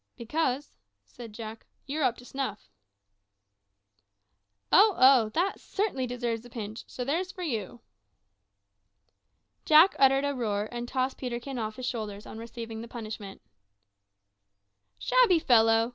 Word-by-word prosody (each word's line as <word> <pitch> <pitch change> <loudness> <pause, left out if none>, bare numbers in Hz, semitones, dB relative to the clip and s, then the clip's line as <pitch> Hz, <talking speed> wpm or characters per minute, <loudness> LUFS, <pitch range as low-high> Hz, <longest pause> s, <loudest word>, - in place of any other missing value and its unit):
"Because," 265 +2 -2 0.3
said 235 -2 -11
Jack, 220 +1 -9 0.2
"you're 290 +3 -2
`_up 250 -3 +2
to - - -13
snuff_.'" 250 -5 -5 2.0
"Oh, 415 0 +6
oh! 255 -4 +6
that 370 +4 0
certainly 380 -11 -2
deserves 235 -2 -3
a 245 - -13
pinch; 220 -2 -7
so 250 - -5
there's 340 +8 -1
for 370 -2 -7
you." 235 - -4 1.8
Jack 315 +5 +6
uttered 270 +1 +5
a 285 - 0
roar, 215 -5 -2
and 240 0 -5
tossed 260 +1 -2
Peterkin 250 +1 -4
off 215 -1 -4
his 255 - -6
shoulders, 215 -4 -4
on 220 - -9
receiving 230 -1 -7
the 230 - -8
punishment. 215 -4 -8 1.5
"Shabby - - +4
fellow!" 225 -5 +4
245 Hz, 130 wpm, -28 LUFS, 225-275 Hz, 2.0 s, Oh